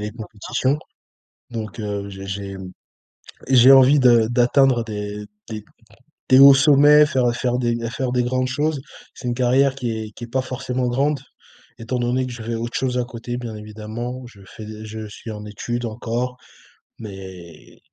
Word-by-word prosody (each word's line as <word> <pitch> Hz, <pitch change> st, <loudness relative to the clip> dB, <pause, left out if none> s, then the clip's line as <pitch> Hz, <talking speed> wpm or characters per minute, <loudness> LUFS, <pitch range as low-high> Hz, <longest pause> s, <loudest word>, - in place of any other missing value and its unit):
les 105 Hz, 0 st, -4 dB
compétitions, 115 Hz, +5 st, -2 dB, 0.7 s
donc 110 Hz, -1 st, -6 dB
heu, 100 Hz, -1 st, -4 dB
j'ai 95 Hz, 0 st, -9 dB
j'ai 100 Hz, 0 st, -5 dB, 0.9 s
j'ai 130 Hz, 0 st, +7 dB
envie 135 Hz, +2 st, +7 dB
de 120 Hz, -4 st, +5 dB
d'atteindre, 125 Hz, +1 st, +3 dB
heu, -, -, -3 dB
des 105 Hz, -1 st, -5 dB, 0.2 s
des 110 Hz, -2 st, -6 dB, 0.6 s
des 130 Hz, -, +6 dB
hauts 140 Hz, 0 st, +10 dB
sommets, 145 Hz, +2 st, +6 dB
faire, 130 Hz, -4 st, 0 dB
heu, -, -, -1 dB
faire 125 Hz, +1 st, -1 dB
des 120 Hz, -1 st, 0 dB, 0.2 s
faire 130 Hz, 0 st, -2 dB
des 125 Hz, 0 st, +1 dB
grandes 130 Hz, +1 st, 0 dB
choses. 145 Hz, +2 st, -1 dB, 0.3 s
C'est 125 Hz, -, -8 dB
une 120 Hz, -, 0 dB
carrière 130 Hz, +2 st, +3 dB
qui 125 Hz, -4 st, -3 dB
est 110 Hz, -1 st, -5 dB
qui 120 Hz, -, -11 dB
est -, -, -15 dB
pas 130 Hz, +3 st, -1 dB
forcément 130 Hz, -1 st, -3 dB
grande, 140 Hz, +4 st, 0 dB, 0.6 s
étant 120 Hz, +2 st, -3 dB
donné 125 Hz, +2 st, 0 dB
que 130 Hz, -, -6 dB
je 120 Hz, -, -8 dB
fais 115 Hz, +1 st, -3 dB
autre 115 Hz, +1 st, -4 dB
chose 125 Hz, -1 st, -1 dB
à 125 Hz, -, +1 dB
côté, 120 Hz, 0 st, -6 dB
bien 120 Hz, -3 st, -6 dB
évidemment. 110 Hz, +4 st, -7 dB
Je 105 Hz, -5 st, -17 dB
fais 110 Hz, +3 st, -10 dB, 0.2 s
je 110 Hz, 0 st, -7 dB
suis 105 Hz, +3 st, -10 dB
en 105 Hz, -1 st, -8 dB
études 120 Hz, +3 st, -4 dB
encore 120 Hz, +3 st, -3 dB, 0.6 s
mais 95 Hz, -5 st, -11 dB
120 Hz, 175 wpm, -21 LUFS, 110-130 Hz, 0.9 s, hauts